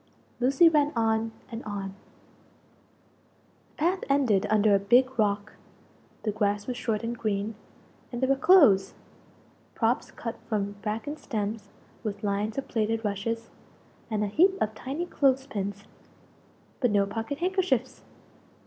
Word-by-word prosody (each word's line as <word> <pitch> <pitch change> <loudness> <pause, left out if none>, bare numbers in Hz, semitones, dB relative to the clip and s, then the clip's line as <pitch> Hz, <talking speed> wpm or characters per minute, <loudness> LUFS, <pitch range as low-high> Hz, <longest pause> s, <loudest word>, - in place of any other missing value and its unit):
Lucie 270 +7 +5
ran 300 -2 +3
on, 225 0 +1 0.2
and 230 +1 -6
on. 200 -2 -4 1.8
The - - -33
path 365 +3 +2
ended 235 -8 +3
under 215 -1 +4
a 200 - +5
big 245 +5 +3
rock. 205 0 0 0.7
The 215 - 0
grass 205 -1 0
was 250 - -3
short 225 -3 -2
and 235 +1 -2
green, 215 -1 -2 0.6
and 240 - -4
there 260 - +1
were 275 - +4
clothes 270 - +5 0.8
props 230 +2 +1
cut 230 -1 -6
from 205 -2 -1
bracken 225 +8 -3
stems, 210 -5 -4 0.3
with 205 -2 -4
lines 205 +2 -1
of 275 - -3
plaited 225 0 -1
rushes, 225 +3 -3 0.6
and 215 -2 0
a - - 0
heap 375 - +3
of 220 - 0
tiny 275 +9 -4
clothes 270 -5 +2
pins 200 -5 -4 1.0
but 245 - +2
no 205 -1 +3
pocket 225 +6 -4
handkerchiefs! 350 - 0
225 Hz, 140 wpm, -27 LUFS, 205-265 Hz, 1.8 s, Lucie